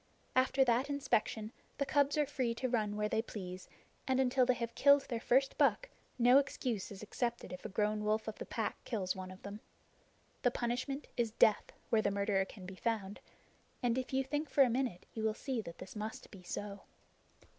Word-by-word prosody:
After 265 +1 +4
that 245 +3 +2
inspection 235 -6 0 0.3
the 280 - 0
cubs 285 +1 +2
are 300 - +4
free 255 -4 -1
to 255 - -1
run 215 -4 0
where 210 0 0
they 220 - +1
please, 185 -5 -7 0.4
and 260 0 +2
until 255 -1 +3
they 255 - +4
have 235 -1 -4
killed 280 +1 +6
their 235 -3 -1
first 265 +3 +2
buck - - +3 0.3
no 250 +2 +7
excuse 250 -6 -2
is 200 0 -8
accepted 235 -1 -3
if 180 - -9
a - - -3
grown 210 +1 0
wolf 215 +1 0
of 220 - -5
the - - -5
Pack - - -3
kills 200 -6 -2
one 185 -1 -6
of 185 0 -12
them. 200 +1 -7 0.8
The 245 - +4
punishment 250 +4 -2
is 235 -2 +2
death 215 -1 +3 0.2
where 225 -2 +5
the - - +1
murderer 200 -1 +1
can 195 -2 -11
be 190 - -7
found; 205 -1 -2 0.6
and 240 -1 +2
if 255 0 -3
you 265 0 +2
think 290 +2 -2
for 275 +1 +6
a 250 - +2
minute 240 -7 -1
you 220 - -4
will 220 0 +1
see 260 -3 -2
that 170 -4 -9
this 185 +3 -10
must 215 +1 -6
be 195 - -11
so. 200 +2 -5
230 Hz, 205 wpm, -34 LUFS, 210-260 Hz, 0.8 s, no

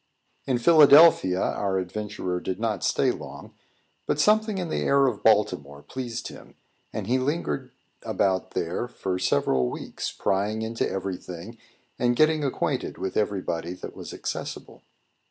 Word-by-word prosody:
In 130 -2 +2
Philadelphia, 145 - +7
our 95 -1 0
adventurer 95 -1 -3
did 95 +1 -4
not 110 -1 -1
stay - - +2
long; - - -9 0.5
but 145 - 0
something 215 +4 +3
in 180 -3 -3
the - - -1
air 140 0 +3
of 125 -6 -1
Baltimore 90 -10 +1
pleased 120 - -5
him, - - -14 0.4
and 105 - -4
he 125 +5 +1
lingered 130 - -2 0.3
about 95 -1 -1
there 90 +6 -2
for 95 -6 -4
several 65 -7 +1
weeks, - - -5
prying 105 +3 -1
into 115 +1 -2
every 95 -1 -3
thing 90 +8 -10 0.4
and 120 0 +2
getting 155 +2 +3
acquainted 135 - -2
with 95 - -4
everybody 90 -4 -2
that - - -9
was - - -8
accessible. - - -6
105 Hz, 145 wpm, -25 LUFS, 90-130 Hz, 0.5 s, Philadelphia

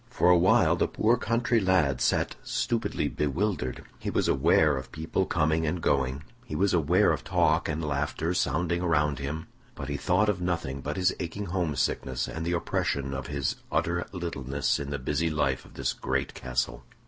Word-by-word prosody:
For 90 -8 +3
a - - +7
while 90 +2 +4
the - - +1
poor 115 +3 +2
country 120 0 +1
lad 90 - +2
sat - - +1
stupidly - - -1
bewildered. 75 -2 -1 0.2
He - - -3
was - - +1
aware 75 +2 +4
of 65 -1 -6
people 80 +1 -1
coming 80 +1 +1
and 85 +3 -1
going; 70 -2 0 0.2
he 75 - -6
was 95 +4 +2
aware 90 +5 +4
of - - -2
talk - - +2
and 80 0 -2
laughter 75 +4 -1
sounding 85 +2 0
around 75 -5 +1
him; 75 +3 -4 0.3
but 70 - -6
he 70 - -2
thought 95 +7 +2
of 100 -4 0
nothing 85 -7 -2
but - - -4
his 90 -1 +2
aching 95 +5 -4
homesickness 75 -7 -1
and 80 - -5
the 85 - 0
oppression 70 -5 -1
of 65 0 -4
his 70 -1 -2
utter 85 +1 0
littleness 70 -7 -2
in 70 -1 -4
the 70 - -2
busy 80 +5 -1
life 75 -1 0
of - - -17
this - - -1
great - - -2
castle. 65 -1 -2
80 Hz, 185 wpm, -28 LUFS, 70-90 Hz, 0.3 s, a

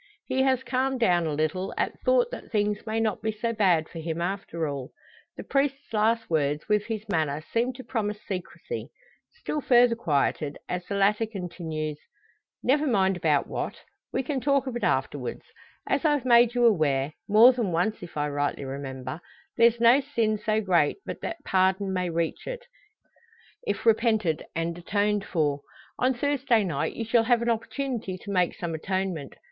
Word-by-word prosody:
He 260 - 0
has 260 -1 +2
calmed 260 +1 0
down 175 -7 +3
a 155 - -1
little, 155 +6 -1
at - - -1
thought - - +3
that - - -8
things 210 0 0
may 220 +1 0
not 220 -2 0
be 220 - 0
so 230 +2 -2
bad 180 -7 +3
for 165 - -9
him 160 0 -3
after 170 -3 -2
all. 140 -3 -5 0.5
The - - -6
priest's 275 -2 -1
last 225 +1 +2
words, 150 -2 0
with 210 -1 +2
his 220 -2 -4
manner, 155 -6 0
seem 235 +2 +2
to 260 +1 -10
promise 215 -4 -2
secrecy. 190 - -5 0.4
Still 305 -10 -4
further 245 -2 +5
quieted 145 -6 0
as 180 0 -3
the 200 - -3
latter 210 +3 +2
continues: 165 -7 -5 0.6
"Never 290 +4 +2
mind 195 -6 +2
about 155 -5 +2
what. - - -4 0.3
We - - -1
can 265 0 -2
talk 275 +1 +2
of 260 -2 -4
it 240 - -4
afterwards. - - -1 0.4
As - - +1
I've 295 -5 +2
made 240 -1 +5
you 245 -1 +4
aware 150 -9 +2 0.2
more 225 +5 +8
than 235 -7 -1
once, 180 +7 0
if 175 - -9
I 150 0 0
rightly 145 -1 -2
remember 135 +1 -6 0.3
there's 235 -1 +4
no 235 +3 +6
sin 230 -6 0
so 215 +1 0
great 175 -7 +2
but - - -6
that 330 -3 -5
pardon 190 +1 +2
may 180 -1 -1
reach 165 -1 -2
it - - -5 1.0
if - - -2
repented 220 -7 +2
and 165 +1 -1
atoned 205 +3 0
for. 145 -4 0 0.4
On 255 +1 +2
Thursday 265 -4 +2
night 155 -7 -2
you 230 - -3
shall 225 0 +3
have 240 -1 +3
an 235 - +2
opportunity 230 -4 -3
to 200 - -8
make 180 -3 +1
some 170 -2 -4
atonement. 185 -3 -3
210 Hz, 175 wpm, -26 LUFS, 165-240 Hz, 1.0 s, more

